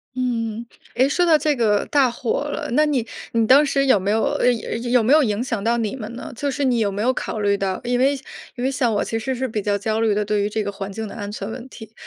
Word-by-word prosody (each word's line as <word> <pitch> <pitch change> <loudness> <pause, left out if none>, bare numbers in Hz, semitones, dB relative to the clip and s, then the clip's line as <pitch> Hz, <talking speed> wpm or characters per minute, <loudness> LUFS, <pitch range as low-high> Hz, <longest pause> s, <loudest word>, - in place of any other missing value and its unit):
嗯。 230 -3 -2 0.3
诶， 260 +2 +4
说 350 +5 +2
到 320 -3 +5
这 300 0 +1
个 210 -4 +2
大 275 -4 +3
火 240 +3 -2
了， 295 0 -4
那 305 +5 +4
你 265 -6 0 0.3
你 230 -1 +2
当 270 +5 +7
时 275 -1 +1
有 235 -7 +4
没 195 +2 -2
有 220 +1 +2 0.2
呃， 250 - +4
有 235 +1 -4
有 245 -2 +4
没 245 +6 +4
有 310 - +6
影 215 -2 0
响 230 -6 -3
到 235 +2 +2
你 225 +1 -2
们 225 -3 -7
呢？ - - -7
就 285 +4 -2
是 280 +2 -2
你 250 -3 +2
有 205 -3 +1
没 200 +1 -3
有 255 +2 +2
考 220 - -4
虑 200 -1 +2
到 195 -2 -2
因 245 0 0
为 275 +2 +4 0.4
因 245 - -5
为 265 - +1
像 255 -3 +1
我 205 - +1
其 225 - -3
实 260 +3 -2
是 260 +1 -2
比 215 -2 -3
较 205 0 0
焦 220 +2 -1
虑 220 -2 +2
的 210 0 0
对 210 0 0
于 205 - 0
这 215 0 -2
个 200 - -3
环 195 0 -6
境 220 +2 -5
的 - - -9
安 205 -3 -5
全 205 0 -5
问 255 +2 -8
题。 220 -3 -12
230 Hz, 310 characters per minute, -21 LUFS, 210-260 Hz, 0.4 s, 当